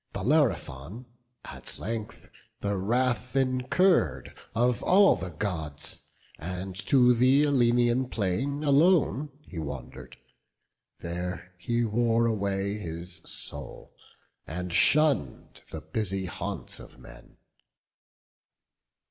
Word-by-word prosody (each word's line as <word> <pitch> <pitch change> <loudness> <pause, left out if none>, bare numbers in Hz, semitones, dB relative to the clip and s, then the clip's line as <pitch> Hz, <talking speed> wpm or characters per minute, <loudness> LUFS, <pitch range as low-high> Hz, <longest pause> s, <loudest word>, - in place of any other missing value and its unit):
Bellerophon 105 - 0 0.4
at - - -8
length 110 0 -6 0.3
the 100 0 -1
wrath 120 +4 0
incurr'd 135 +8 +2 0.2
Of 120 +2 +2
all 195 +5 +6
the 95 - -5
Gods; 80 -7 -4 0.4
and 90 +3 -5
to 125 -2 +6
th' 130 +5 +4
Aleian 120 -2 +2
plain 130 +9 -1
Alone 150 0 +3
he 90 - -8
wander'd; 70 -4 -7 0.8
there 90 +1 -5
he 120 +5 0
wore 115 +1 +2
away 100 -2 -1
His 85 -1 -6
soul, 70 -4 -8 0.5
and 90 +2 -5
shunn'd 140 - +2
the - - -6
busy 95 -3 -2
haunts 85 - -5
of - - -13
men. - - -15
115 Hz, 95 wpm, -28 LUFS, 90-130 Hz, 0.8 s, all